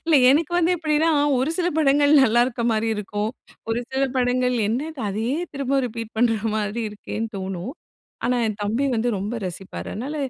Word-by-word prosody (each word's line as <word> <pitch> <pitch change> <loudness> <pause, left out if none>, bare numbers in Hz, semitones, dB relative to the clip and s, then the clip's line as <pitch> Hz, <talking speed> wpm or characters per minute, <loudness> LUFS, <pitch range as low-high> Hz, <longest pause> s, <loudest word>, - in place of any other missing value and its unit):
இல்ல 325 -2 +4
எனக்கு 310 +4 +2
வந்து 350 0 +3
எப்படின்னா, 310 0 +1 0.3
ஒரு 265 +5 0
சில 355 -1 +1
படங்கள் 285 0 +4
நல்லா 240 -1 +4
இருக்க 240 -2 -4
மாதிரி 220 0 0
இருக்கும். 210 +1 -2 0.4
ஒரு 230 +2 0
சில 265 +1 0
படங்கள் 250 0 +2
என்னது 270 +6 -3
அதையே 220 +6 -1 0.2
திரும்ப 275 0 0
ரிப்பீட் 230 -1 -6
பண்ற 230 -2 +3 0.2
மாதிரி 215 +2 -2
இருக்கேன்னு 215 +2 -5
தோணும். 190 +5 -4 0.5
ஆனா 250 - +2
என் 215 -1 -3
தம்பி 220 +7 0
வந்து 230 +2 0
ரொம்ப 205 +5 -3
ரசிப்பார். 185 +2 -7
அதனால 270 +8 -4
245 Hz, 170 wpm, -23 LUFS, 215-280 Hz, 0.5 s, இல்ல